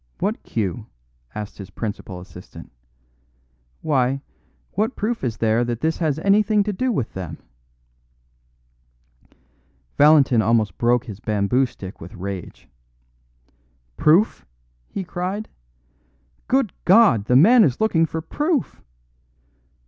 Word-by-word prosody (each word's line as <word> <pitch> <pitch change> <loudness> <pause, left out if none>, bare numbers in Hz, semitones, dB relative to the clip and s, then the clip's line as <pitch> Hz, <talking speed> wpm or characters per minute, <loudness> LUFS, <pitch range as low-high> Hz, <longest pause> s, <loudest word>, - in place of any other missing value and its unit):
What 210 +4 -2
cue?" 110 0 -3 0.5
asked 105 0 -7
his 100 - -8
principal 100 -4 -6
assistant. 90 0 -13 1.1
"Why, 135 -2 +1 0.5
what 215 +6 -1
proof 225 - -2
is 115 -4 -2
there 115 +1 +2
that 120 -1 -3
this 160 +1 0
has 155 -4 0
anything 205 +4 +3
to 210 0 -3
do 255 +6 -1
with 135 - -2
them?" 90 -4 -6 2.6
Valentin 145 -6 +5
almost 110 -4 +1
broke 120 +1 +2
his 105 -5 -9
bamboo 110 +4 +1
stick 95 -5 -11
with 85 - -10
rage. 95 -1 -7 1.3
"Proof!" 165 - +3 0.5
he 195 - -4
cried. 185 +4 -4 1.0
"Good 265 -6 +1
God! 185 - +5
the 125 - +2
man 220 - +7
is 130 -8 +1
looking 165 -7 +2
for 160 +1 -4
proof! 295 - -2
135 Hz, 115 wpm, -22 LUFS, -, 2.6 s, man